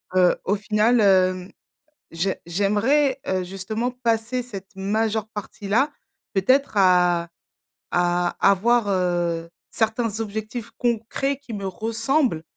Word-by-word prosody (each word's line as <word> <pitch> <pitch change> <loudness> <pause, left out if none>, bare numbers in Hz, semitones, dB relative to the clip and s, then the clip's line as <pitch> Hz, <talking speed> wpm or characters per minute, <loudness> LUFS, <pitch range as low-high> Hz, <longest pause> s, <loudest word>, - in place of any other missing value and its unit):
heu, 180 -1 +5
au 200 - +2
final, 215 +3 +2
hem, 185 -2 +3 0.6
j'ai 175 +4 -1
j'aimerais, 225 - +2
heu, 185 -1 0
justement 205 +6 -3
passer 240 0 -1
cette 200 -4 -10
majeure 215 +2 -1
partie 205 -1 -8
là, 265 +9 +3 0.4
peut-être 255 +6 +2
à 180 -3 +4 0.6
à 175 0 +1
avoir, 225 +3 +3
heu, 175 -3 0 0.2
certains 220 -1 -1
objectifs 220 +2 -5
concrets 240 +4 -1
qui 280 -4 -11
me 200 -1 -4
ressemblent 225 - 0
210 Hz, 115 wpm, -23 LUFS, 185-235 Hz, 0.6 s, heu